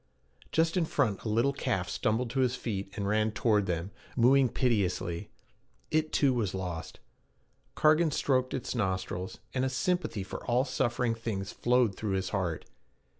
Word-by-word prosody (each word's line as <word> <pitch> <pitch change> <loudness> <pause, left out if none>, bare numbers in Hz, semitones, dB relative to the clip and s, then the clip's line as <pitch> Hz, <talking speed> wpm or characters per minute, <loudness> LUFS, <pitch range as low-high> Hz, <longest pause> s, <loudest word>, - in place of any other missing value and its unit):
Just 165 +2 +2
in 175 - +3
front 125 -10 0
a 110 - -4
little 115 +6 +2
calf 105 -10 -1
stumbled 115 +2 0
to 135 - +1
its 125 -1 +2
feet 100 -6 -4
and 100 -1 -1
ran 110 +1 +2
toward 105 -3 +2
them, 85 +2 -2 0.3
mooing 130 +2 +5
piteously. 95 -9 0 0.6
It, 155 0 +1
too, 140 -3 +3
was 105 -6 -1
lost. 90 -4 -5 0.8
Cargan 155 +2 +4
stroked 130 -3 +1
its 130 - -3
nostrils, 95 -4 -2 0.2
and 130 - 0
a 130 - +1
sympathy 130 - -1
for - - -7
all 125 +2 +3
suffering 125 -2 0
things 105 -3 -4
flowed 125 -3 +2
through 105 -3 -2
his 95 0 -1
heart. 90 -6 -2
115 Hz, 160 wpm, -30 LUFS, 95-130 Hz, 0.8 s, mooing